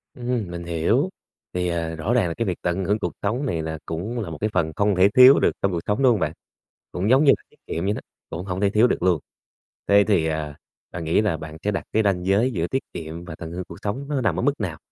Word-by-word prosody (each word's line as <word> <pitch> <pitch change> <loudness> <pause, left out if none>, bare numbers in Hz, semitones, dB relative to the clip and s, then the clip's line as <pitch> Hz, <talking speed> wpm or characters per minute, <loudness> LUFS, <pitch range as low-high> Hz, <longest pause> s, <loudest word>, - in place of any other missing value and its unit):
Ừm, 120 -5 -2
mình 85 0 -5
hiểu. 85 - +1 0.4
Thì, 90 0 -1
ờ, 85 -1 -2
rõ 90 +9 -1
ràng 120 -7 +3
là 85 - -2
cái 115 - -2
việc 90 -4 -2
tận 90 +2 -1
hưởng 105 +3 +1
cuộc - - -2
sống 120 +8 0
này 85 -11 -1
là 80 0 -4
cũng 100 +9 -4
là 105 -7 -4
một 80 - -6
cái 110 - +1
phần 80 -1 +1
không 100 -1 +2
thể 95 +2 +5
thiếu 130 +3 +9
được - - +3
trong 100 - +2
cuộc 85 - -1
sống, 105 +6 +1
đúng 130 - +6
hông 110 - +1
bạn? - - -1 0.6
Cũng 95 +5 -1
giống 135 +4 +5
như 140 - +7
là - - -28
kiệm 85 - -3
vậy 100 - +1
đó, - - -5 0.3
cũng 85 +4 -5
hổng 95 0 -3
thể 100 - +3
thiếu 110 +4 +4
được - - -1
luôn. 90 -4 +3 0.7
Thế 100 0 +6
thì 90 -7 +3
à, 75 -2 -3 0.4
bạn 85 -1 -5
nghĩ 80 +5 +2
là 100 -7 0
bạn 80 0 -8
sẽ 105 - +1
đặt 95 - -2
cái 110 - +3
ranh 95 -3 0
giới 105 +7 +3
giữa 85 -6 -1
tiết 135 - -1
kiệm 85 0 -6
và 85 -3 -7
tận 80 - -7
hưởng 90 +2 -4
cuộc 85 - -10
sống 110 +7 -3
nó 140 -3 -1
nằm 100 -8 0
ở - - 0
mức - - +2
nào? - - -3
95 Hz, 280 wpm, -23 LUFS, 85-110 Hz, 0.7 s, thiếu